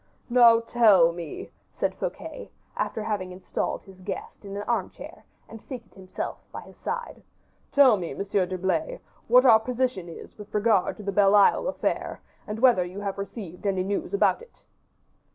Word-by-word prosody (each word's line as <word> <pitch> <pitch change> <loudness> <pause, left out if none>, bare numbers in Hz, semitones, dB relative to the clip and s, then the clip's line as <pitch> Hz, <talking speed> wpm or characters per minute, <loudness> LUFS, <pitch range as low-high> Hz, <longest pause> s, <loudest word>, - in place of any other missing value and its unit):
"Now 235 -2 +7
tell 215 -8 +5
me," 170 -3 -8 0.2
said - - -1
Fouquet, - - -6 0.3
after 220 - -2
having 205 -4 -3
installed 180 +1 -4
his 190 -1 -16
guest 195 +3 -7
in 200 0 -7
an 205 - -4
armchair 220 -4 -4 0.2
and 225 -1 -11
seated 250 -4 -10
himself 190 -1 -6
by - - -7
his - - -15
side, 475 -1 -5 0.5
"tell 265 -6 +6
me, 175 -3 -5
Monsieur 195 -2 0
d'Herblay, 185 -3 -2 0.3
what 250 +2 +7
is - - -4
our 225 -3 +8
position 250 -5 -2 0.3
with 210 0 -10
regard 210 -3 +2
to 210 - -9
the 200 - -2
Belle 200 0 +4
Isle 205 - +4
affair, - - -2 0.3
and 210 - -4
whether 235 -6 +4
you 180 +3 -7
have 200 -1 -4
received 200 -2 -6
any 190 -2 0
news 200 +1 -3
about 400 - +2
it." 470 - -17
205 Hz, 170 wpm, -26 LUFS, 185-230 Hz, 0.5 s, our